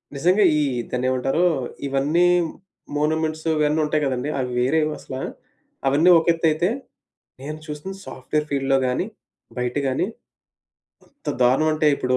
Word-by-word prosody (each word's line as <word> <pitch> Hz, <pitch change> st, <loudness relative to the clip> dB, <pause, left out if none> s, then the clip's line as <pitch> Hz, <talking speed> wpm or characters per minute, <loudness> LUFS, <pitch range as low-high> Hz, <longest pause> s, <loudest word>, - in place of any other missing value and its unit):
నిజంగా. 180 Hz, +8 st, +3 dB, 0.2 s
ఈ -, -, +2 dB, 0.3 s
దాన్నేమంటారు? 130 Hz, +6 st, +1 dB, 0.4 s
ఇవన్నీ 145 Hz, +6 st, +2 dB, 0.7 s
మోనోమేంట్స్ 155 Hz, +1 st, 0 dB
ఇవన్నీ 150 Hz, +1 st, +2 dB
ఉంటాయి 150 Hz, 0 st, 0 dB
గదండీ! 130 Hz, +1 st, -1 dB
అవి 125 Hz, -1 st, -2 dB
వేరేవి 155 Hz, +5 st, +2 dB
అసల 130 Hz, -, -8 dB, 0.7 s
అవన్నీ 145 Hz, +6 st, +4 dB
ఒకెత్తయితే, 165 Hz, +1 st, +2 dB, 0.7 s
నేను 150 Hz, +3 st, -6 dB
చూసిన 150 Hz, +5 st, -6 dB
సాఫ్ట్‌వేర్ 150 Hz, +4 st, -3 dB
ఫీల్డ్‌లో 135 Hz, -1 st, +2 dB
గాని, 125 Hz, +9 st, 0 dB, 0.5 s
బయట 125 Hz, 0 st, -1 dB
గాని. 130 Hz, -1 st, 0 dB, 1.0 s
ఎంత -, -, -11 dB
దారుణం 130 Hz, +6 st, +4 dB
అంటే 155 Hz, 0 st, +1 dB
ఇప్పుడు 130 Hz, -1 st, 0 dB
150 Hz, 120 wpm, -23 LUFS, 130-155 Hz, 1.0 s, అవన్నీ